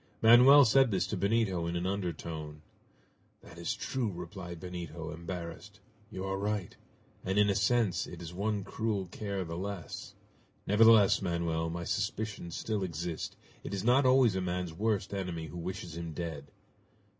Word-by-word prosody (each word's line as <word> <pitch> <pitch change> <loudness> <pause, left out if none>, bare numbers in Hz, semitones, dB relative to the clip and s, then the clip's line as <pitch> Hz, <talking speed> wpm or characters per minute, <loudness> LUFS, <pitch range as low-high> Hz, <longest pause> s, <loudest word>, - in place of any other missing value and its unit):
Manoel 125 +5 +9
said 130 +3 +5
this 95 -4 +1
to - - -3
Benito 100 -3 +1
in 85 - -2
an 85 +1 -1
undertone. 80 -5 -4 0.8
"That 85 - -13
is 85 - -2
true!" 125 -6 -2
replied 85 0 -7
Benito, 85 -3 -6
embarrassed. 85 +4 -7 0.3
"You 95 -3 -5
are 95 0 -2
right, 105 -2 -2 0.5
and 95 +2 -1
in 105 -1 +5
a - - -1
sense 105 -1 +2
it 85 - -9
is 85 0 -8
one 100 +2 -1
cruel 105 -2 -2
care 100 +1 -4
the 80 0 -5
less! 100 -3 -6 0.5
Nevertheless, 110 -1 +6
Manoel, 85 -3 -1
my 85 +1 -4
suspicions 100 -2 -3
still 110 -2 -2
exist! 85 -2 -4 0.3
It - - -4
is 95 - -3
not 130 +3 +4
always 130 -5 +5
a 95 - 0
man's 90 -2 -2
worst 105 +2 -1
enemy 90 -4 -3
who 85 +3 -8
wishes 90 -1 -5
him 85 -1 -5
dead!" 75 -3 -5
95 Hz, 160 wpm, -31 LUFS, 85-105 Hz, 0.8 s, Manoel